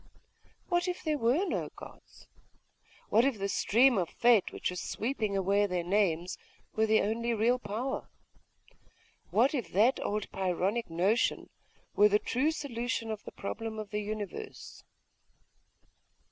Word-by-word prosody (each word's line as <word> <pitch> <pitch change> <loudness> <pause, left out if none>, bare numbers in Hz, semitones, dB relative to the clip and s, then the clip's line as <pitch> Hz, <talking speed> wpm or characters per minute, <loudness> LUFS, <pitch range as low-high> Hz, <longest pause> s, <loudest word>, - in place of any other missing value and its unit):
What 350 0 +1
if 360 0 -3
there 305 -2 0
were 255 +11 +2
no - - -2
gods? - - -14 0.8
What 225 +3 +5
if 270 -4 +1
the 200 0 -2
stream 235 +3 +3
of 175 - -1
fate, 235 -5 +3
which - - -3
was 180 - -5
sweeping 220 -4 -2
away 200 +2 +2
their 180 -2 -2
names; 180 -2 0 0.4
were 220 0 +2
the 220 0 +4
only 230 +3 -1
real 235 +4 +2
power? 235 +5 -4 1.2
What 250 +7 +3
if 255 -6 -3
that 225 +7 +4
old 210 0 -3
Pyrrhonic 190 +4 -1
notion 185 +8 +1 0.4
were 210 +1 +6
the 210 - +4
true 260 +7 0
solution 240 -7 -3
of 215 -1 -5
the - - -7
problem 220 +2 -5
of 215 -2 -6
the 210 0 -1
Universe? 215 - -7
220 Hz, 145 wpm, -30 LUFS, 200-245 Hz, 1.2 s, were